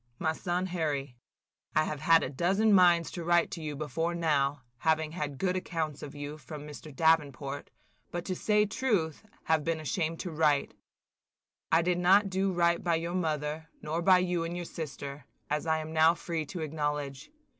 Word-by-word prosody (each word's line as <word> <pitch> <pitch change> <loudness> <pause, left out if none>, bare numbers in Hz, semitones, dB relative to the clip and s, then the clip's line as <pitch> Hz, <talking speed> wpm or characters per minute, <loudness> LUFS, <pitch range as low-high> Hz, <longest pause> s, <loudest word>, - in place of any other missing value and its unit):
"MY 160 +3 0
SON 175 +2 -1
HARRY: 150 -7 -2 0.3
– - - -42
"I 155 - +5
have 155 -1 -3
had 165 +2 +5
a - - -2
dozen 195 +9 +2
minds 175 -3 +5
to 175 - -5
write 175 0 +3
to 170 - -5
you 150 -2 -4
before 160 +4 -2
now, 145 -4 +1 0.2
having 160 0 +1
had 150 -4 -4
good 185 +4 0
accounts 160 -5 -3
of 150 0 -8
you 145 +1 -6
from 150 -1 -8
Mr. 150 +1 -9
Davenport; 145 -2 +1 0.4
but, 175 0 -4
to 185 - -2
say 210 +2 +2
truth, 200 - -1 0.2
have 160 -2 +2
been 165 0 -1
ashamed 160 +1 -2
to 180 - -5
write. 150 -3 +2 1.0
I 165 +1 +5
did 175 0 +1
not 195 +3 +5
do 190 +1 +1
right 170 -1 +2
by 170 -2 +2
your 170 +2 -2
mother, 155 -2 -2
nor 160 +3 -2
by 185 +1 +6
you 180 -2 0
and 170 +1 -4
your 175 0 -4
sister, 140 -4 -7 0.3
as 150 +2 -1
I 160 0 +3
am 155 0 -5
now 160 +1 +5
free 165 -3 -3
to 175 +1 -6
acknowledge. 150 - -3
160 Hz, 190 wpm, -30 LUFS, 150-175 Hz, 1.0 s, by